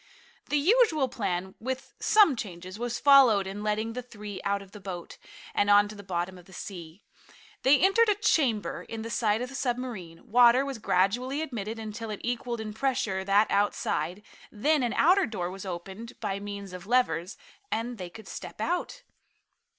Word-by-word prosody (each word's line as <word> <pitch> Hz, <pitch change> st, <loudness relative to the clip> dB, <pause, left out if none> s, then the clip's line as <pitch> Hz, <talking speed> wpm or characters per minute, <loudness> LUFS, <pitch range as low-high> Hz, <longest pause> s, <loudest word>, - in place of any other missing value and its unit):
The 295 Hz, -, +2 dB
usual 330 Hz, -, +4 dB
plan, 190 Hz, -6 st, -3 dB
with 260 Hz, +2 st, -5 dB
some 410 Hz, -10 st, +5 dB
changes, 185 Hz, -2 st, -7 dB
was 240 Hz, 0 st, -2 dB
followed 260 Hz, -8 st, +6 dB
in 195 Hz, +2 st, -6 dB
letting 215 Hz, +2 st, -1 dB
the 250 Hz, -, -4 dB
three 210 Hz, -5 st, -8 dB
out 200 Hz, 0 st, -1 dB
of 195 Hz, -, -18 dB
the 210 Hz, -, -10 dB
boat, 180 Hz, -3 st, -7 dB, 0.3 s
and 205 Hz, -, +2 dB
on 205 Hz, 0 st, +6 dB
to -, -, -8 dB
the 200 Hz, -, -9 dB
bottom 185 Hz, -1 st, -3 dB
of 175 Hz, -, -17 dB
the 190 Hz, -, -16 dB
sea. 175 Hz, -1 st, -9 dB, 0.6 s
They 275 Hz, +2 st, +6 dB
entered 425 Hz, +4 st, +4 dB
a 415 Hz, -, +4 dB
chamber 265 Hz, -, +1 dB
in 225 Hz, -1 st, -5 dB
the 230 Hz, -, -6 dB
side 225 Hz, -1 st, +1 dB
of 250 Hz, -, -5 dB
the -, -, -11 dB
submarine, 245 Hz, -9 st, -4 dB
water 245 Hz, +3 st, +6 dB
was 275 Hz, -4 st, -5 dB
gradually 245 Hz, +10 st, +1 dB
admitted 225 Hz, -6 st, -5 dB
until 220 Hz, 0 st, -6 dB
it 210 Hz, -, -5 dB
equaled 240 Hz, -1 st, -2 dB
in 215 Hz, -1 st, -6 dB
pressure 220 Hz, -6 st, -1 dB
that 200 Hz, +2 st, +3 dB
outside, 195 Hz, -2 st, 0 dB, 0.3 s
then 290 Hz, +8 st, +2 dB
an 240 Hz, -2 st, 0 dB
outer 375 Hz, +1 st, +4 dB
door 180 Hz, -6 st, -3 dB
was 195 Hz, +1 st, -8 dB
opened 190 Hz, +7 st, -7 dB
by 200 Hz, -3 st, -2 dB
means 200 Hz, -2 st, -7 dB
of 180 Hz, +2 st, -9 dB
levers, 195 Hz, -7 st, +1 dB, 0.3 s
and 230 Hz, 0 st, -2 dB
they 180 Hz, -1 st, -5 dB
could 220 Hz, +4 st, -12 dB
step -, -, -8 dB
out. 430 Hz, +8 st, -2 dB
215 Hz, 180 wpm, -28 LUFS, 195-250 Hz, 0.6 s, followed